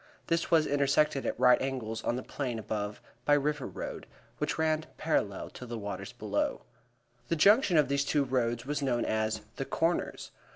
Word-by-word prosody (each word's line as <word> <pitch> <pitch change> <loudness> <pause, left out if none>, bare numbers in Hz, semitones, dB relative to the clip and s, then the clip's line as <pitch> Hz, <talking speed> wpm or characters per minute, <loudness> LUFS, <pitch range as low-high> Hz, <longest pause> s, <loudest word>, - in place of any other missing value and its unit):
This 165 0 0
was 160 -2 +5
intersected 140 0 +2
at - - -2
right 125 0 +6
angles 115 -5 -3
on 120 - 0
the 125 - -4
plain 125 -5 -3
above 105 -1 -3 0.2
by 145 - +5
River 145 -1 0
Road, - - -6 0.3
which 150 0 -1
ran 155 -1 +1
parallel - - -1
to 125 - -9
the 120 0 -4
waters 105 -1 -5
below. - - -2 0.6
The 165 - +1
junction 200 - +5
of 150 -3 +5
these 140 +1 +1
two 145 +1 +2
roads 120 -2 0
was 145 +1 -2
known 125 -4 +1
as 110 0 0 0.2
"The 135 - -2
Corners." 165 +4 -1
135 Hz, 175 wpm, -30 LUFS, 120-150 Hz, 0.6 s, right